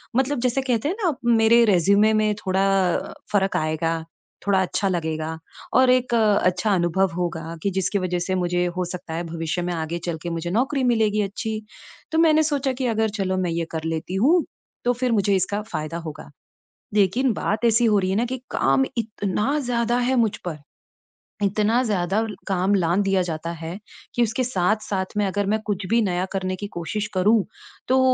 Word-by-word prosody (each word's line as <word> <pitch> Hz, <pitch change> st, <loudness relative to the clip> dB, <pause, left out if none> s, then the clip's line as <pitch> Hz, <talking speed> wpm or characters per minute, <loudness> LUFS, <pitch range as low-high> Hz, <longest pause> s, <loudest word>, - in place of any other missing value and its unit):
मतलब 265 Hz, 0 st, +1 dB
जैसे 255 Hz, +2 st, +1 dB
कहते 255 Hz, +1 st, 0 dB
हैं 375 Hz, -, -1 dB
ना 340 Hz, -, +2 dB, 0.2 s
मेरे 225 Hz, +1 st, +5 dB
रिज़्यूमे 200 Hz, +2 st, +4 dB
में 215 Hz, -1 st, +2 dB
थोड़ा 190 Hz, -1 st, 0 dB, 0.7 s
फ़र्क 195 Hz, -2 st, +1 dB
आएगा, 160 Hz, +1 st, -1 dB, 0.4 s
थोड़ा 195 Hz, -1 st, +4 dB
अच्छा 185 Hz, +2 st, -1 dB
लगेगा 160 Hz, -2 st, -2 dB, 0.4 s
और 255 Hz, -1 st, +5 dB
एक 250 Hz, -1 st, +2 dB
अच्छा 210 Hz, -2 st, +2 dB
अनुभव 175 Hz, +1 st, +1 dB
होगा 165 Hz, -2 st, -3 dB
कि 200 Hz, -, +2 dB
जिसकी 190 Hz, +2 st, 0 dB
वज़ह 180 Hz, -1 st, -1 dB
से 185 Hz, +2 st, -1 dB
मुझे 180 Hz, -1 st, 0 dB
हो 180 Hz, -, 0 dB
सकता 175 Hz, -2 st, -7 dB
है 165 Hz, +2 st, -2 dB
भविष्य 165 Hz, +1 st, -3 dB
में 175 Hz, 0 st, -2 dB
आगे 165 Hz, 0 st, -3 dB
चल 170 Hz, -2 st, -2 dB
के 175 Hz, -, -3 dB
मुझे 170 Hz, 0 st, -3 dB
नौकरी 265 Hz, +6 st, +1 dB
मिलेगी 220 Hz, -3 st, +2 dB
अच्छी। 215 Hz, +2 st, -3 dB, 0.5 s
तो 320 Hz, -, 0 dB
मैंने 315 Hz, -1 st, +5 dB
सोचा 285 Hz, -3 st, 0 dB
कि 255 Hz, +1 st, -3 dB
अगर 220 Hz, -1 st, +1 dB
चलो 185 Hz, -1 st, 0 dB
मैं 180 Hz, -2 st, 0 dB
ये 165 Hz, 0 st, -1 dB
कर 160 Hz, -1 st, -4 dB
लेती 165 Hz, +3 st, -3 dB
हूँ 330 Hz, +5 st, +5 dB, 0.4 s
तो 245 Hz, -, +3 dB
फिर 250 Hz, 0 st, -1 dB
मुझे 200 Hz, -2 st, +2 dB
इसका 200 Hz, +3 st, 0 dB
फ़ायदा 165 Hz, -6 st, -5 dB
होगा। 150 Hz, -, -8 dB, 0.7 s
लेकिन 215 Hz, +6 st, +3 dB
बात 215 Hz, +2 st, -2 dB
ऐसी 230 Hz, +1 st, +4 dB
हो 210 Hz, -2 st, +4 dB
रही 185 Hz, -1 st, 0 dB
है 190 Hz, -, 0 dB
ना 230 Hz, -, +2 dB
कि 260 Hz, +2 st, -4 dB
काम 135 Hz, 0 st, +2 dB
इतना 215 Hz, +4 st, -1 dB
ज़्यादा 240 Hz, -2 st, 0 dB
है 250 Hz, +2 st, +1 dB
मुझ 225 Hz, -4 st, +2 dB
पर। 160 Hz, -3 st, -4 dB, 0.9 s
इतना 215 Hz, +4 st, +2 dB
ज़्यादा 200 Hz, 0 st, 0 dB, 0.2 s
काम 190 Hz, +1 st, +2 dB
लांद 180 Hz, +1 st, +2 dB
दिया 195 Hz, -1 st, +2 dB
जाता 165 Hz, -1 st, -3 dB
है 170 Hz, +3 st, -6 dB, 0.4 s
कि 240 Hz, -, +3 dB
उसके 235 Hz, +3 st, 0 dB
साथ-साथ 200 Hz, -2 st, -1 dB
में 205 Hz, -, +2 dB
अगर 205 Hz, +1 st, -1 dB
मैं 220 Hz, -, +1 dB
कुछ 205 Hz, -2 st, -2 dB
भी 230 Hz, +1 st, +3 dB
नया 180 Hz, -3 st, 0 dB
करने 185 Hz, -1 st, -1 dB
की 205 Hz, +2 st, -6 dB
कोशिश 205 Hz, +6 st, -3 dB
करूँ 205 Hz, +3 st, +3 dB, 0.4 s
तो 260 Hz, +1 st, +4 dB
200 Hz, 190 wpm, -23 LUFS, 175-230 Hz, 0.9 s, मेरे